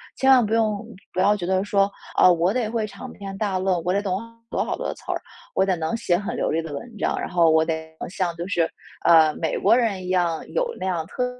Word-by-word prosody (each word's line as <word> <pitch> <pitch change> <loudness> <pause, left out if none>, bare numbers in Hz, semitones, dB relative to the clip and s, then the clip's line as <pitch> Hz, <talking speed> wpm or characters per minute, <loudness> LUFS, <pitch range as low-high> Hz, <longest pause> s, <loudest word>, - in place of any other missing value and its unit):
千 265 - +2
万 255 -3 +7
不 215 - -2
用 215 -3 +1 0.3
不 - - -3
要 205 +3 +4
觉 190 - -6
得 185 +1 +1
说： 200 -1 +2 0.3
“啊， 185 - +7
我 175 +4 +2
得 240 -4 0
会 225 -1 -1
长 200 -1 -9
篇 195 -1 -7
大 195 -2 -1
论， 185 -2 0
我 180 - 0
得 200 - +2
懂 185 -2 -1
好 230 0 -13 0.2
多 - - 0
好 - - -3
多 - - -3
词 - - -18
儿， - - -2 0.4
我 190 - +3
得 190 -1 +1
能 165 +7 -2
写 180 -6 +1
很 200 +3 -3
流 - - 0
利 165 +1 +1
的 160 - -7
文 215 +10 -8
章， - - 0
然 - - -3
后 170 -2 +4
我 160 0 +4
得 160 -1 -3 0.2
像 175 -3 -2
就 170 +2 -5
是， 170 -4 +1 0.4
呃， 160 -2 +6
美 160 - -1
国 200 - +4
人 210 -7 0
一 - - -5
样 175 -3 0
有 - - 0
那 - - -3
样 175 -4 -1
特 250 +7 -2
190 Hz, 280 characters per minute, -23 LUFS, 170-210 Hz, 0.4 s, 万